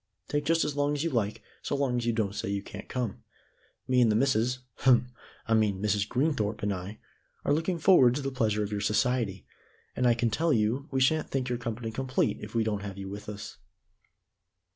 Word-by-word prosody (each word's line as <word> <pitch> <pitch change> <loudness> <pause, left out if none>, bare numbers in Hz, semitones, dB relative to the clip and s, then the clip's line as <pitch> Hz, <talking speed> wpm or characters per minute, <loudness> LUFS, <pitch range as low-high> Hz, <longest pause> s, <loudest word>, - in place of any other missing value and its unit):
"Take 145 0 -1
just 165 +2 +3
as 150 - -2
long 145 0 +1
as 145 - -2
you 165 - -1
like 110 -5 -1 0.2
so - - -2
long 135 -3 0
as 120 -1 -2
you - - +3
don't 110 -3 -1
say 100 - -3
you 100 0 -2
can't 105 - -9
come. 125 -5 -3 0.6
Me 125 -1 +4
and 115 -3 +5
the - - +2
missus 125 0 +2 0.2
hem! 125 -1 +4 0.4
I 115 - +2
mean 105 -3 +2
Mrs. 105 0 0
Greenthorpe 120 -7 0
and 100 0 +1
I 95 +3 -6 0.5
are - - +3
looking 165 +4 0
forward 150 -8 +6
to 145 - -3
the 135 - -2
pleasure 110 -5 +1
of 105 - -4
your 105 -1 -2
society, 105 -2 0 0.5
and 125 - +2
I 120 - +5
can 115 -1 0
tell 160 +7 +2
you 115 +6 +1
we 135 -1 0
sha'n't 155 +4 +2
think 130 -2 -2
our 120 - 0
company 115 -1 -4
complete 130 +2 0
if - - -9
we 115 - +3
don't 105 -2 -1
have 100 -1 -6
you 95 -1 -6
with 105 +1 -7
us." 105 0 -8
120 Hz, 220 wpm, -29 LUFS, 105-135 Hz, 0.6 s, forward